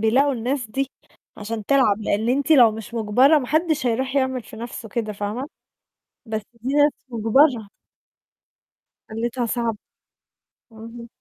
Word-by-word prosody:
بيلاقوا 260 +6 +3
الناس 250 +1 -2
دي، 275 +2 -2 0.5
عشان 215 0 -5
تلعب، 260 -7 +3
لإن 215 +2 -1
أنتِ 275 +3 0
لو 245 -7 +7
مش 220 +1 -9
مُجبرة 245 +7 +4
محدش 305 +2 0
هيرُوح 260 +3 -1
يعمل 260 -2 0
في 220 - -13
نفسُه 230 0 -7
كده، 215 0 -3
فاهمة؟ 210 +7 -4 0.8
بس 220 -1 -3
دي 240 +4 -4
ناس 290 0 +4 0.2
مُجبرة. 235 0 +2 1.4
حالتها 235 +2 -2
صعبة، 230 -2 -2 0.9
أها. 230 +1 -10
235 Hz, 130 wpm, -22 LUFS, 220-270 Hz, 1.4 s, لو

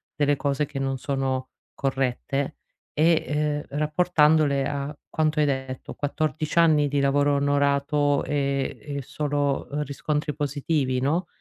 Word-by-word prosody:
delle 145 -1 +2
cose 140 +1 0
che 140 -1 -8
non 135 -1 -1
sono 130 -1 -2 0.2
corrette 135 +1 -1 0.4
e, 160 +2 +3
ehm, 150 0 -1 0.2
rapportandole 150 -3 +3
a 145 +1 -3
quanto 155 -1 0
hai 150 - +4
detto, 130 -2 -3
14 155 +2 -1
anni 155 -3 +5
di 140 0 0
lavoro 145 +1 +3
onorato 140 0 +2
e 140 -2 -1 0.2
e - - -2
solo, 145 0 -1
ehm, 150 +1 -1
riscontri 150 +1 -2
positivi, 145 -2 0
no. 160 +7 0
145 Hz, 130 wpm, -25 LUFS, 140-150 Hz, 0.4 s, anni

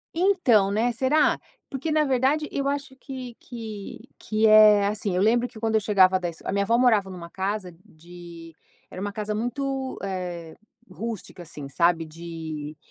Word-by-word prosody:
Então 330 - +3
né, 225 +4 +1
será? 275 +5 +2 0.3
Porque, 275 +4 -3
na 305 0 +3
verdade, 270 +3 +1
eu 275 0 -1
acho 285 -1 -4
que 260 -3 -8
que 220 -1 -8
que 215 0 0
é 215 -1 +7
assim. 205 -2 -1
eu 180 - +1
lembro 235 +3 +3
que 235 -3 -13
quando 225 -1 -1
eu 220 - +3
chegava 190 -3 +4
das 175 -2 -5
a - - -3
minha 200 +1 +1
avó 230 +3 +3
morava 220 -6 +3
numa 170 -2 -9
casa 190 -1 -3
de 170 -3 -13 0.4
era 185 - -7
uma 205 0 -3
casa 210 +1 -3
muito, 265 +4 -3
eh, 180 -4 -5 0.3
rústica, 220 -5 -7
assim, 150 -4 -8
sabe, 165 +3 +2
de 160 -2 -7
210 Hz, 165 wpm, -25 LUFS, 175-245 Hz, 0.4 s, é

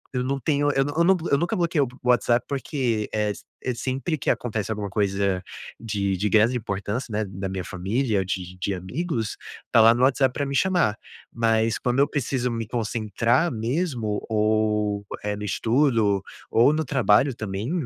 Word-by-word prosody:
eu 125 - 0
não 135 +2 -1
tenho, 145 +1 +1
eu 135 - +2
não 145 - -3
eu 170 - +4
não, 190 +2 +5
eu 140 - +5
nunca 175 +7 0
bloqueio 170 - +1 0.2
o 125 - -1
WhatsApp, 120 0 +3
porque, 130 -6 -1
eh, 105 -1 +1
s - - -9 0.2
eh, 130 - -1
sempre 135 +6 -2
que 130 - -2
acontece 110 -4 -1
alguma 105 -2 -3
coisa 100 -2 0 0.4
de 100 -4 -1
de 105 +3 0
grande 110 +4 +4
importância, 105 +2 -3
né, 105 0 -1
na 95 0 -5
minha 95 -1 -4
família, 100 +4 -1
de 90 -1 -4
de 100 +1 -1
amigos, 110 - -3 0.4
tá 115 - +6
lá 115 +1 +8
no 125 - +1
WhatsApp 130 0 +3
pra 145 - -2
me 140 0 -3
chamar, 175 - +2 0.4
mas 115 -1 +1
quando 125 0 0
eu 140 - +5
preciso 130 -3 -1
me 115 -2 -3
concentrar 115 - 0
mesmo 120 - -2
ou, 105 -1 +1 0.2
eh, 105 0 -1
no 105 - -6
estudo 110 -2 +2 0.3
ou 120 +5 +5
no 155 0 -1
trabalho 130 -1 +3
também 105 +3 -4
115 Hz, 180 wpm, -24 LUFS, 105-135 Hz, 0.4 s, lá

